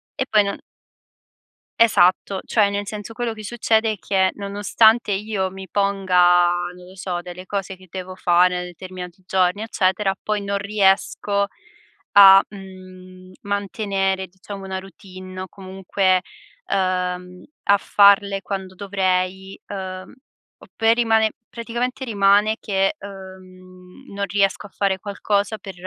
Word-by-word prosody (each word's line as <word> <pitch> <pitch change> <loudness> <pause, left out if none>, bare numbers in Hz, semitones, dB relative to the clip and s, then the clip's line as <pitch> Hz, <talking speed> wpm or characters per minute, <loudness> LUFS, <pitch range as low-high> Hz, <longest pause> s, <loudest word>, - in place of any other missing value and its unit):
E 265 - -2
poi 210 -1 +5
non 200 - -4 1.2
Esatto, 195 -3 +3
cioè, 210 -3 +2
nel 200 0 -3
senso, 210 +1 -7
quello 235 0 -3
che 215 -1 -10
succede 220 0 +1
è - - -9
che, 190 -1 +1
nonostante 205 +3 +2
io 200 -1 -1
mi 190 0 -10
ponga, 180 -2 +3 0.2
non 180 0 -14
lo 185 - -14
so, 180 -2 -4
delle 180 +1 -9
cose 195 -1 -4
che 185 0 -18
devo 185 +1 -7
fare, 180 0 +3
nei - - -4
determinati 180 +1 -9
giorni, 185 +2 +1
eccetera, 195 -2 0
poi 210 -1 -2
non 200 0 -2
riesco 200 0 +1 0.7
a, 195 -1 +9
mhmm, 185 -1 -13
mantenere, 195 -1 -2
diciamo, 195 +2 -10
una 190 0 -4
routine. 185 0 -11
O 185 - -6
comunque, 190 0 -1 0.5
uhm, 180 -1 -2 0.2
a 200 - +4
farle 200 0 +4
quando 190 -2 -5
dovrei, 190 -1 -2
uhm, 185 -2 -7 0.5
o - - -15
per 225 +1 +3
rimane 225 -2 +3 0.2
praticamente 240 +3 -4
rimane 205 0 +3
che, 195 +1 0
uhm, 185 -3 -13
non 200 0 -2
riesco 200 +1 0
a - - -24
fare 195 -1 -1
qualcosa 205 +1 -1
per 195 -2 -9
195 Hz, 135 wpm, -21 LUFS, 185-205 Hz, 1.2 s, a